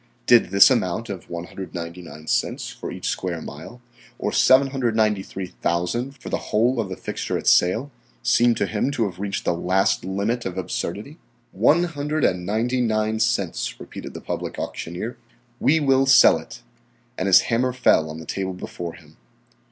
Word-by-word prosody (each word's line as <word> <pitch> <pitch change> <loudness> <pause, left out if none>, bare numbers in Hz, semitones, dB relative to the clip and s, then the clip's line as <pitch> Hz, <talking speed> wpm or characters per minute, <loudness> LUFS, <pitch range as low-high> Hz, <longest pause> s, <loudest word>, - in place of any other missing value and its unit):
Did 120 -1 +5
this 100 +1 +7
amount 95 +5 0
of 95 -3 -8
199 85 -2 -7
cents - - -1
for - - -7
each - - -5
square 90 -3 -2
mile 120 +8 -10 0.4
or - - -2
$793,000 110 -3 +1
for - - -9
the - - 0
whole 120 +4 +1
of 105 -4 -2
the 95 - -4
fixture - - -3
at - - -7
sale 110 +11 +3 0.3
seem 120 0 +4
to 100 - 0
him 105 +6 -1
to 125 -5 0
have 90 -3 -6
reached 100 -1 -3
the - - +2
last 95 +3 +1
limit 100 +6 -2
of 95 0 -5
absurdity? 105 - -4 0.3
"One 145 - +3
hundred 150 -2 -2
and 90 -1 +1
ninety 120 +5 0
nine 110 -1 0
cents," 100 -5 -1
repeated - - -9
the - - -7
public - - -5
auctioneer. 90 +8 -5 0.4
"We 160 +2 +3
will 135 -2 +3
sell 135 - +7
it," - - -12 0.5
and 95 - -2
his 95 - +7
hammer 125 +2 0
fell 100 -10 +3
on 80 - -7
the 80 - -9
table 95 -1 -3
before 85 -2 -7
him. 75 -2 -18
105 Hz, 165 wpm, -23 LUFS, 90-125 Hz, 0.5 s, this